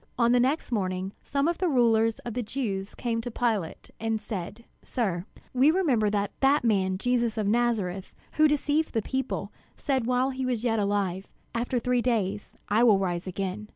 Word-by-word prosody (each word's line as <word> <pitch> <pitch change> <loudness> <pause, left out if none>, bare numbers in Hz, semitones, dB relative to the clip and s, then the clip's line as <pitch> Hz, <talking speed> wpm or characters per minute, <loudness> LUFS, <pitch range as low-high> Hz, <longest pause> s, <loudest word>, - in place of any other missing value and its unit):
On 235 -1 +4
the 245 - +5
next 265 +3 0
morning, 190 -3 -1
some 280 +1 0
of 340 0 -1
the 370 - +1
rulers 225 -4 +3
of 240 - -4
the 250 - -1
Jews 210 -5 -3
came 230 -2 -2
to 245 - -5
Pilate, 220 -8 -2
and 225 0 -1
said: 210 +2 -6 0.2
"Sir, 190 -8 -2 0.3
we 260 +3 +5
remember 285 - +2
that 205 -1 -1
that 275 +1 +3
man 190 -5 +2
Jesus 240 0 0
of 215 - 0
Nazareth, 205 -4 0 0.2
who 310 0 +4
deceived 295 0 0
the 225 - +1
people, 265 -1 -3 0.3
said 265 -5 -1
while 255 +2 +2
he 260 0 -4
was 245 -3 -1
yet 225 -2 +1
alive, 200 -2 -1 0.3
'After 240 +2 -1
three 250 0 +1
days 210 -5 -1
I 220 +3 +3
will 220 -5 +6
rise 180 -2 -2
again.' 195 +3 -4
230 Hz, 185 wpm, -27 LUFS, 200-250 Hz, 0.3 s, will